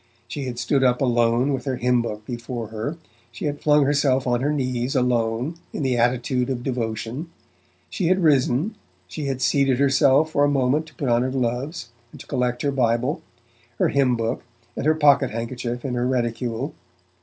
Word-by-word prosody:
She 135 +3 -5
had 125 -2 -5
stood 135 +2 +1
up 125 -1 +3
alone 120 +1 +2
with 130 -2 -3
her 135 -2 -1
hymn 125 0 +2
book 105 -2 -5
before 120 -2 -5
her; 115 +9 -4 0.3
she 120 - -6
had 145 -1 -3
flung 150 -1 +4
herself 135 -2 +2
on 120 -1 +1
her 145 +3 +1
knees 130 -2 -1
alone, 125 +4 0
in - - -3
the 130 -2 +1
attitude 125 +1 +1
of 125 -2 -3
devotion; 120 +4 -3 0.6
she 180 - -2
had 185 +1 +2
risen; 145 - +2 0.3
she 140 +11 -5
had 135 -2 -2
seated 135 0 +3
herself 140 +2 +4
for 145 - +2
a 145 - +4
moment 140 +3 +1
to 150 - -17
put 140 - -3
on 120 0 +3
her 130 - 0
gloves, 125 +2 -2 0.2
and - - -13
to - - -10
collect 125 -2 -1
her 140 - +1
Bible, 125 +3 0 0.6
her - - +2
hymn 135 -3 +2
book 115 +1 -2 0.3
and 145 - -2
her 155 - +4
pocket 140 -4 +4
handkerchief 120 +2 -4
in 130 - -2
her 120 0 0
reticule. 120 -2 -2
130 Hz, 190 wpm, -23 LUFS, 120-140 Hz, 0.6 s, flung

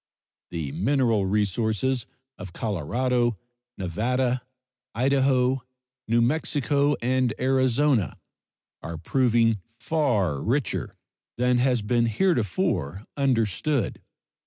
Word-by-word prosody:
The 80 -5 -4
mineral 110 - +1
resources 110 +5 0 0.3
of 95 -4 -8
Colorado, 120 - 0 0.4
Nevada, 120 +7 0 0.5
Idaho, 130 0 +2 0.5
New 115 +1 +3
Mexico, 145 +1 +1
and 130 -1 +1
Arizona 130 - +2 0.6
are 85 0 -6
proving 115 - +2 0.2
far 110 - 0
richer 125 -2 -1 0.4
than 125 0 +2
has 125 -3 +2
been 115 +2 +2
heretofore 105 - 0
understood. 130 -1 0
120 Hz, 85 wpm, -25 LUFS, 105-130 Hz, 0.6 s, New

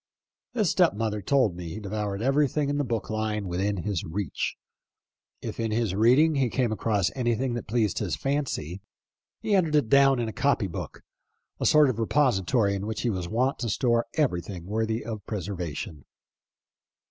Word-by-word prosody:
His 215 -5 +2
step 175 - +3
mother 105 -1 -2
told 120 -4 +2
me 85 -1 -6
he 105 - -6
devoured 105 0 -3
everything 145 +1 +2
in 145 - -1
the - - +2
book 115 -5 -3
line 110 -2 -2
within 95 +1 -1
his 100 -5 -2
reach. 90 0 -3 0.9
If - - -5
in 115 -1 0
his 110 -3 0
reading 125 +10 +5
he 135 -4 +1
came 120 -1 0
across 105 -3 0
anything 120 0 0
that 120 - -5
pleased 110 -3 +1
his - - -1
fancy, 135 - -2 0.6
he 210 - 0
entered 165 -6 +3
it 145 -7 +2
down 135 0 +5
in 120 -1 -1
a 110 - -5
copy 140 -4 +1
book 90 - -7 0.3
— - - -49
a - - +3
sort 150 -1 +6
of 120 -4 -1
repository, 115 -4 +2
in 100 +1 -3
which 110 0 -3
he 120 - 0
was 90 -3 -4
wont 125 +5 0
to 120 - -2
store 120 +1 +1
everything 90 - -1
worthy 110 +3 -1
of 110 -3 -5
preserva 90 -6 -4
tion. 75 -4 -7
110 Hz, 180 wpm, -27 LUFS, 100-135 Hz, 0.9 s, sort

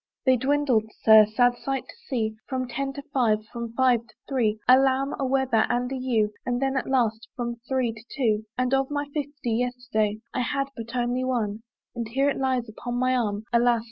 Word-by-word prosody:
They 260 -1 +5
dwindled, 265 -3 +2 0.2
Sir, 220 -1 +8
sad 245 +3 +2
sight 270 -1 -2
to - - -11
see! 225 -5 -1
From 255 -2 -2
ten 270 +3 -3
to 280 0 -7
five, 215 -5 +2
from 235 -1 -5
five 255 -1 +4
to - - -21
three, 230 -6 +1
A 255 +1 +8
lamb, 270 +1 +1
a 275 - 0
weather, 260 -4 +2
and 245 +1 0
a - - -2
ewe; 235 -5 +1
And 245 0 -1
then 270 0 0
at 265 - -1
last, 230 -4 +1
from 240 -1 -3
three 255 -4 +1
to 220 0 -13
two; 220 -5 +1
And 255 +1 0
of 270 0 +2
my 290 0 -2
fifty, 285 -4 -3
yesterday 245 -4 -1 0.2
I - - -1
had 275 +2 -1
but 230 +2 -7
only 245 +1 0
one, 225 -5 -1 0.3
And 235 -2 -4
here 270 +5 +1
it - - -4
lies 260 -3 0
upon 240 +3 -6
my 255 +1 +2
arm, 210 -4 -1
Alas! 240 0 +4
245 Hz, 205 wpm, -25 LUFS, 230-265 Hz, 0.3 s, Sir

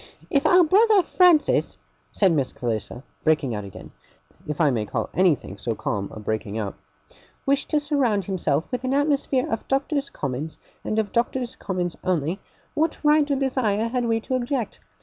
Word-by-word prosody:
'If 280 - +3
our 360 0 +6
brother 405 +4 +5
Francis,' 345 -3 +3 0.3
said 195 -3 +3
Miss 140 -5 0
Clarissa, 120 +1 -4 0.2
breaking 150 -6 +2
out 105 -1 -4
again, 100 - -11 0.6
if 150 -1 -4
I 150 -4 +4
may 115 -4 0
call - - -3
anything 155 - +1
so 115 +2 -2
calm 100 -2 -3
a - - -8
breaking 110 0 -3
out, 105 -3 -3 0.7
'wished 275 0 +1
to 305 - +2
surround 270 - +1
himself 160 -6 0
with 250 0 -3
an 260 +1 0
atmosphere 280 -2 +1
of 225 - -3
Doctors' 275 +1 0
Commons, 145 +3 -4 0.3
and 215 - -2
of 215 -2 0
Doctors' 240 +1 -1
Commons 180 -3 -3
only, 175 +1 0 0.3
what 315 +1 0
right 300 0 +4
or 280 - +2
desire 240 -5 0
had 245 0 -1
we 225 -1 +1
to 260 - -4
object? 255 -1 -2
220 Hz, 170 wpm, -24 LUFS, -, 0.7 s, our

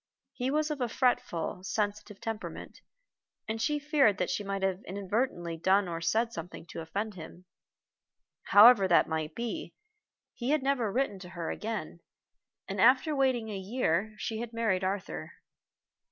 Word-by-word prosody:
He 250 0 -2
was 305 +2 +1
of 290 -3 -4
a 245 - 0
fretful, 205 -8 0
sensitive 210 0 -3
temperament, 225 -1 -6 0.7
and 220 +1 -3
she 295 +5 +1
feared 290 - +3
that - - -1
she 205 - -2
might 195 -1 -3
have 190 0 0
inadvertently 190 -3 -2
done 190 +3 +3
or 165 -1 -4
said 225 +8 +1
something 165 0 -7
to - - -6
offend 205 +6 -3
him. 175 +1 -11 1.0
However 205 -1 +8
that 175 - +5
might 155 -1 -3
be, 240 +8 -4 0.6
he 240 +1 -4
had 300 -2 +2
never 260 -6 +1
written 235 -4 -1
to 180 -1 -10
her 170 -2 -4
again, 210 -7 -5 0.7
and 195 0 -2
after 260 +5 +5
waiting 260 -5 +1
a 210 - -4
year 200 0 -1
she 220 -1 -3
had 235 0 -5
married 215 -5 0
Arthur. 185 - -3
210 Hz, 155 wpm, -30 LUFS, 185-245 Hz, 1.0 s, However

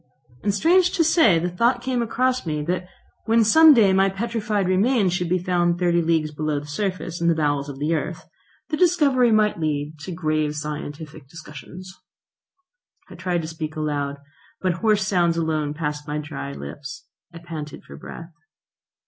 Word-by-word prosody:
And, 205 - +1
strange 345 - +3
to 340 - +3
say, 315 - +4
the 170 +2 -1
thought 235 +6 +1
came 255 -1 -1
across 255 +2 0
me 150 -3 -3
that 180 +3 -2 0.4
when 225 0 +4
some 315 +9 +7
day 205 -5 +5
my 195 +1 +4
petrified 210 -1 -2
remains 195 0 +2
should 180 -2 -1
be 185 - +2
found 175 -1 +1
thirty 175 -1 +2
leagues 160 -2 0
below 150 -1 -2
the 145 - -10
surface 175 +1 -4
in 170 - +1
the 170 - +3
bowels 145 -2 0
of 140 - -7
the 150 +4 -1
earth, 160 - -4 0.4
the 305 - -1
discovery 290 -9 +3
might 215 -4 +2
lead 150 -1 -2
to 170 +5 -7
grave 155 -3 -1
scientific 150 0 -7
discussions. 165 +4 -11 1.2
I - - -8
tried 175 -1 -2
to - - -5
speak 160 -1 -6
aloud, 145 -2 -2 0.4
but 185 -1 0
hoarse 210 -3 +2
sounds 175 -4 +1
alone 155 -3 -1
passed 150 -1 -4
my 150 0 -3
dry 70 - -6
lips. 70 - -8 0.3
I 165 - -11
panted 160 -3 -8
for 70 - -12
breath. 165 - -10
170 Hz, 175 wpm, -23 LUFS, 150-210 Hz, 1.2 s, some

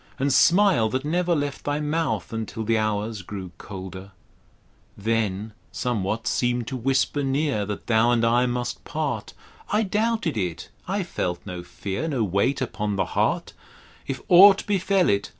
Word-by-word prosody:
And 140 0 +1
smile 175 - +5
that 130 +4 -2
never 175 +2 +1
left 145 -2 -3
thy 145 0 -1
mouth 150 -4 -1
Until 110 0 -4
the 115 +1 +1
Hours 110 0 -1
grew 95 -1 -7
colder: 95 0 -8 0.8
Then 110 -1 -1 0.2
somewhat 110 -2 -2
seem'd 120 -1 0
to 135 - -4
whisper 135 +3 +1
near 135 -6 0
That 105 -1 -5
thou 115 0 +3
and 120 -1 +3
I 120 +2 +3
must 120 0 -3
part; 140 -9 -3 0.4
I 210 +2 +3
doubted 215 - 0
it; 90 -5 -3 0.2
I 195 +1 -1
felt 90 - -3
no 90 -2 -6
fear, 100 - -4
No 135 -7 0
weight 100 +8 +1
upon 105 -5 -2
the 100 - +1
heart: - - 0 0.5
If 135 - -4
aught 195 +2 +8
befell 195 -2 +2
it. 100 0 +1
120 Hz, 155 wpm, -24 LUFS, 105-150 Hz, 0.8 s, aught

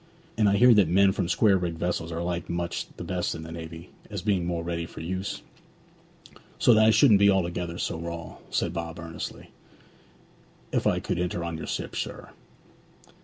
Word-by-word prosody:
And 105 -2 +3
I 100 - +3
hear 125 +2 +7
that 105 -5 +5
men 95 +3 +5
from 90 -2 -2
square 100 -4 +4
rigged 85 -2 -3
vessels 85 -1 -2
are 85 +1 -3
liked 85 -1 -3
much 85 0 -2
the - - -6
best - - -2
in 80 - -7
the 80 - -8
navy, 80 0 -8 0.2
as - - -5
being 95 -5 +1
more 85 -1 -2
ready 85 0 -3
for - - -11
use? 95 +4 -4 1.1
So 120 - +5
that 110 0 +5
I - - +7
shouldn't 110 -1 +6
be 100 0 +6
altogether 85 -2 0
so 85 - -2
raw,' 85 0 -6
said 85 - -1
Bob 85 -1 -5
earnestly, 85 0 -7 1.2
'if - - +1
I - - +2
could - - -2
enter 90 -1 -2
on 85 -1 -3
your 80 - -6
ship, - - -4
sir. - - -5
85 Hz, 190 wpm, -27 LUFS, 85-95 Hz, 1.2 s, hear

